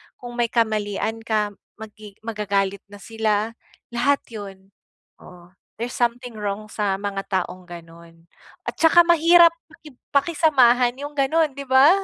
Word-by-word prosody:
kung 240 -1 -10
may 240 - +2
kamalian 220 -1 -1
ka 215 -2 -1 0.2
magi 215 -2 -12
magagalit 200 -3 -1
na 205 0 -14
sila 220 -1 -1 0.4
lahat 260 +4 +1
yun. 195 -3 -10 0.5
Oo, 175 -1 -16 0.3
there's 240 +2 -3
something 240 0 -2
wrong 210 +1 -4
sa 205 -2 -1
mga 200 -1 -4 0.2
taong 185 +1 -11
gano'n 170 -1 -14 0.4
at - - -3
saka 330 +1 +6
mahirap 340 0 +6 0.2
paki 315 -2 -15 0.2
pakisamahan 270 -6 +3
yung 290 +1 -6
gano'n, 300 +3 +1
'di 280 0 -7
ba? 265 +3 +6
225 Hz, 135 wpm, -22 LUFS, 200-265 Hz, 0.5 s, saka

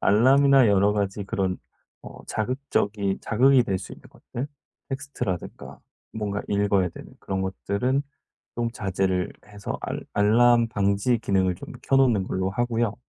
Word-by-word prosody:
알람이나 135 +4 +5
여러 100 0 +4
가지 100 -1 -2
그런 95 -1 -2 0.4
어 - - -11
자극적인 105 -5 -1
자극이 130 +3 +4
될 95 -6 -1
수 - - -9
있는 - - -12
것들 125 +4 -7 0.4
텍스트라든가 135 - -5 0.3
뭔가 105 -2 -3
읽어야 100 -2 +2
되는 - - -12
그런 95 -1 -3
것들은 100 +8 -1 0.5
좀 120 -1 -1
자제를 95 -4 -1
해서 100 -1 -6
알 - - -3
알람 115 +3 +4
방지 100 +3 +1
기능을 95 -4 +1
좀 - - -10
켜 135 - +2
놓는 120 -8 +3
걸로 95 0 -2
하고요. 115 0 -1
105 Hz, 295 characters per minute, -25 LUFS, 95-120 Hz, 0.5 s, 알람이나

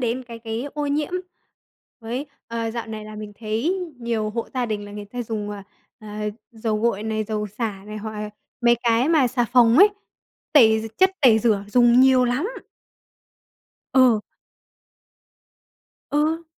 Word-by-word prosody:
đến 245 +1 -1
cái 235 -1 -9
cái 225 +1 -4
ô 295 -1 -2
nhiễm 295 +3 -1 0.9
với, 240 +5 -4 0.2
ờ, 230 -1 -3
dạo 230 0 -5
này 220 -1 -7
là 215 0 -9
mình 210 -1 -7
thấy 235 - -1 0.2
nhiều 230 -3 -2
hộ 230 +1 -4
gia 250 -2 0
đình 210 -2 -3
là 205 - -10
người 205 0 -7
ta 245 +4 -5
dùng, 215 -2 -4
ờ, 205 -1 -7 0.4
ờ, 215 - -12 0.5
dầu 220 -1 -2
gội 220 -3 0
này, 220 0 -2
dầu 210 0 -3
xả 210 -1 -4
này 210 0 -7
hoặc, 215 +1 -6
à, 210 0 -5 0.3
mấy 235 -1 +5
cái 235 +3 +2
mà 310 -6 +4
xà 245 0 0
phòng 240 +2 +4
ấy, 405 - +9 0.6
tẩy 220 -7 +6
gi 225 - -6
chất 375 0 +5
tẩy 235 -5 +7
rửa 215 -3 +1
dùng 240 +2 +5
nhiều 260 -1 +5
lắm. 250 +8 0 1.5
Ừ. 255 -4 +5 1.9
Ừ. 315 +3 +1
230 Hz, 165 wpm, -23 LUFS, 215-250 Hz, 1.9 s, ấy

